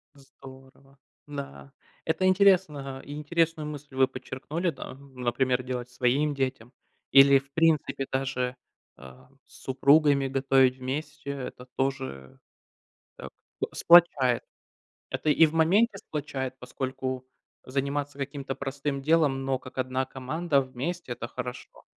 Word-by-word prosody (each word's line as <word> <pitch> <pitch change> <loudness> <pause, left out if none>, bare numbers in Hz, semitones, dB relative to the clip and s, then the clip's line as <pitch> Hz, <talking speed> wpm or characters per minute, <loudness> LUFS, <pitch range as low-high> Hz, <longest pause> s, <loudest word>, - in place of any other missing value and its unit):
Здорово, 135 0 -16 0.3
да. 140 -1 -8 0.3
Это 160 +4 0
интересно, 180 -9 +3
а, - - -10
и 145 - -9
интересную 160 +1 0
мысль 145 -2 -9
вы 130 0 +4
подчеркнули, 155 +9 -4
да. 135 -4 -7
Например, 130 -1 -1
делать 125 -1 -4
своим 130 +5 +1
детям, 130 -3 -3 0.4
или, 135 0 +8
в 135 +1 -20
принципе, 160 -4 +2
даже, 130 -1 -1 0.4
э, 65 0 -12 0.3
с - - -17
супругами 140 +1 +4
готовить 135 -1 +3
вместе 140 +3 -5
это 130 -2 -7
тоже, 130 - -3 0.8
э, - - -8 0.5
сплачает. 150 -8 +5 0.7
Это 155 - -1
и 160 +2 +6
в 155 - -5
моменте 195 +7 +3
сплачает, 135 -5 -4
поскольку 130 0 -4 0.4
заниматься 140 +2 -2
каким-то 140 -1 -4
простым 140 0 -4
делом, 145 -3 +2
но 135 -1 0
как 130 0 -12
одна 130 +1 0
команда, 140 +4 0
вместе- 130 +3 -4
это 120 - -5
хорошо. 125 0 -8
135 Hz, 125 wpm, -27 LUFS, 130-150 Hz, 0.8 s, или